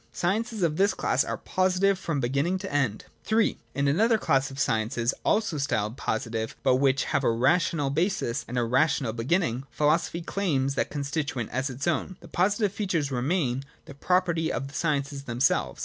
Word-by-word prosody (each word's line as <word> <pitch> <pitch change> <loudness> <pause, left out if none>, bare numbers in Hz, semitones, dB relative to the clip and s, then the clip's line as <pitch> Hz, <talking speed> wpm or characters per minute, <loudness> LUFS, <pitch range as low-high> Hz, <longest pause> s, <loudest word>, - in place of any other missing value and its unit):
Sciences 215 +3 -1
of 160 -2 +1
this 200 +2 +3
class - - +1
are - - -3
positive 185 +1 +1
from 165 -6 -2
beginning 140 +9 0
to 190 -2 -7
end. 130 -7 0 0.3
III. 220 0 +2 0.2
In 140 +1 +1
another 220 +11 +3
class 135 -8 +1
of 135 - -10
sciences, 115 -1 0
also 210 -8 +1
styled 110 -5 -1
positive, 110 -2 -3
but 130 - +4
which 135 0 +2
have 140 -2 0
a - - +3
rational 145 +4 +2
basis 155 - 0
and 125 - -4
a 120 - +2
rational 130 0 +1
beginning, 125 +1 0
philosophy 165 +3 +1
claims 145 -8 0
that - - -1
constituent 140 -5 -3
as 130 +2 -1
its 130 +1 -5
own. 175 +2 -1
The - - -13
positive 200 +2 +1
features 170 -9 -1
remain 135 0 0 0.2
the - - -10
property 170 +1 +1
of 135 - -3
the - - -15
sciences 140 -3 -1
themselves. 125 +2 0
145 Hz, 175 wpm, -27 LUFS, 130-180 Hz, 0.3 s, but